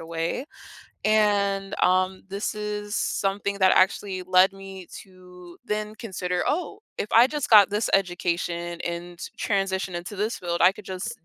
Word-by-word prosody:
away, 165 +8 -3 0.6
and, 200 -2 +2
um, 185 +1 +2
this 200 +3 -3
is 210 0 -4
something 200 0 -1
that 190 -1 +5
actually 190 0 +2
led 185 +1 +4
me 195 -1 -10 0.2
to 180 -2 -15
then 210 0 -3
consider, 180 -5 -3
"Oh, 360 +7 -2 0.2
if 210 - -3
I 235 +3 +7
just 295 0 -3
got 205 -3 +7
this 210 +2 0
education, 175 -2 -1
and 170 0 -5 0.2
transition 195 -2 -1
into 175 +4 -6
this 210 +4 -2
field, 170 -1 -3
I 180 +2 +6
could 205 0 -13
just 185 -3 -6
195 Hz, 150 wpm, -25 LUFS, 180-205 Hz, 0.6 s, I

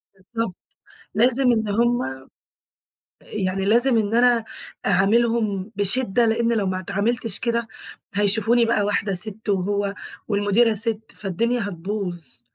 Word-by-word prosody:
بالضبط، 195 +1 -4 0.6
لازم 250 +3 +3
إن 220 -2 0
هُم 235 +4 +2 1.2
يعني 190 -1 -2
لازم 235 +4 +4
إن 215 -1 0
أنا 240 -1 +4 0.4
أعاملهم 210 +1 +2
بشدّة، 220 +2 +2
لإن 230 +1 +1
لو 205 -4 0
ما 185 0 -1
اتعامِلتش 200 +3 -1
كده 235 -1 -1 0.5
هيشوفوني 220 +4 +2
بقى 225 -2 +1
واحدة 205 -1 0
سِتّ، 215 +3 -4
وهو 200 +1 0 0.4
والمديرة 205 +3 +3
سِتّ، 220 0 -1
فالدنيا 230 +5 -1
هتبوظ. 175 - -4
215 Hz, 115 wpm, -23 LUFS, 195-235 Hz, 1.2 s, لازم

